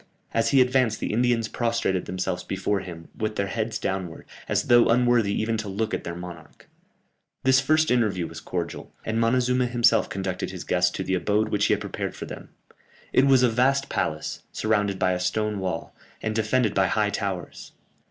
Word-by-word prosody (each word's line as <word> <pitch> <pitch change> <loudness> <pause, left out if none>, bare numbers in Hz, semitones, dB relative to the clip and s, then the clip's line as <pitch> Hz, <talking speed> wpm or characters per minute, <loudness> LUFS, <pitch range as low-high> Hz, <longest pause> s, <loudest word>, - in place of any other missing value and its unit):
As 115 - +2
he 135 -2 +5
advanced 125 -3 +2
the - - -2
Indians 120 -1 +2
prostrated 115 -6 -1
themselves 90 -1 -3
before 95 +1 -1
him, 85 -3 -9
with 110 0 -3
their 100 - 0
heads 110 +2 -2
downwards, 95 -5 -4 0.2
as - - +1
though 120 -1 +5
unworthy 120 -3 +3
even 110 +1 0
to 110 -2 -4
look 110 +3 -2
at - - -2
their 85 - -4
monarch. 85 -2 -10 0.8
This 130 0 +5
first 155 +3 +2
interview 105 -8 +1
was 80 0 -8
cordial, 85 0 -5
and 110 +1 -1
Montezuma 125 +2 +2
himself 120 -2 +3
conducted 95 -1 -3
his 90 -2 -7
guests 90 0 +2
to 95 - -3
the 95 - -2
abode 105 +4 +1
which 105 -1 +1
he - - +3
had - - -8
prepared - - -4
for - - -6
them. - - -9 0.6
It 135 - +5
was 130 -2 +5
a - - +6
vast 135 +4 +2
palace, 75 0 -2
surrounded 105 -3 0
by 95 -1 +2
a 90 - -1
stone 105 +3 -1
wall, 90 -3 -4 0.2
and 110 - -2
defended 110 0 +1
by 95 -1 +3
high 105 0 +1
towers. 95 -4 -5
110 Hz, 190 wpm, -25 LUFS, 95-120 Hz, 0.8 s, a